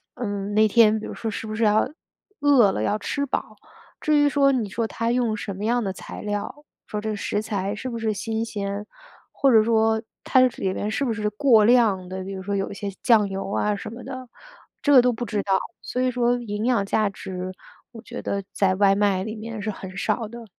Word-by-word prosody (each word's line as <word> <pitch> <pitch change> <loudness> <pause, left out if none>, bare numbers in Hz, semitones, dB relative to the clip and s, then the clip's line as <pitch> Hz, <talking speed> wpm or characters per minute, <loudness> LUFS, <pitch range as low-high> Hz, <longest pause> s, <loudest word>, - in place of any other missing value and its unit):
嗯， 205 -3 -3
那 215 +1 +5
天 220 0 +5
比 - - -7
如 - - -6
说 225 -1 -4
是 220 - -5
不 215 - -4
是 225 0 +1
还 210 - +5
要 215 - +2 0.5
饿 265 -9 +5
了 105 - -2
要 210 - +1
吃 280 +6 -2
饱。 280 - -3 0.5
至 305 -1 +3
于 290 - +5
说 275 -1 +4
你 235 -6 -1
说 225 +3 -1
它 230 +1 -2
用 240 -3 +1
什 200 - -5
么 200 - -6
样 240 +1 +1
的 195 - -1
材 - - -9
料， 210 +8 -4 0.2
说 210 - -3
这 215 -1 -2
食 205 +1 -2
材 200 -2 -2
是 255 +4 -5
不 235 - -4
是 220 -1 -1
新 225 +2 -2
鲜， 200 -1 -4 0.5
或 275 - +2
者 220 -2 +6
说 220 -1 +2 0.2
它 260 - +4
里 195 -7 +1
面 210 - -2
是 280 - -1
不 230 - 0
是 210 0 -1
过 220 -2 +5
量 220 -7 +4
的， 190 0 -5
比 195 +1 -6
如 190 - -6
说 200 +1 -2
有 195 - -1
一 - - -5
些 200 0 -4
酱 220 -4 +4
油 195 0 -4
啊 210 0 +1
什 210 +2 -7
么 240 +2 -9
的， 255 -2 -8 0.5
这 290 - +2
个 255 - +9
都 250 0 +3
不 240 +2 -4
知 205 -2 -1
道。 195 -1 +2 0.2
所 250 - -3
以 255 0 +2
说 245 0 +2
营 210 -1 -4
养 235 -6 +2
价 215 0 +1
值 185 -1 -6 0.4
我 225 - -9
觉 - - -7
得 200 -1 -2
在 190 -2 +2
外 195 0 +4
卖 200 -2 +2
里 220 +1 -5
面 220 0 -6
是 215 +1 -2
很 190 -1 -9
少 215 +2 -1
的。 235 +1 -10
215 Hz, 255 characters per minute, -24 LUFS, 200-235 Hz, 0.5 s, 个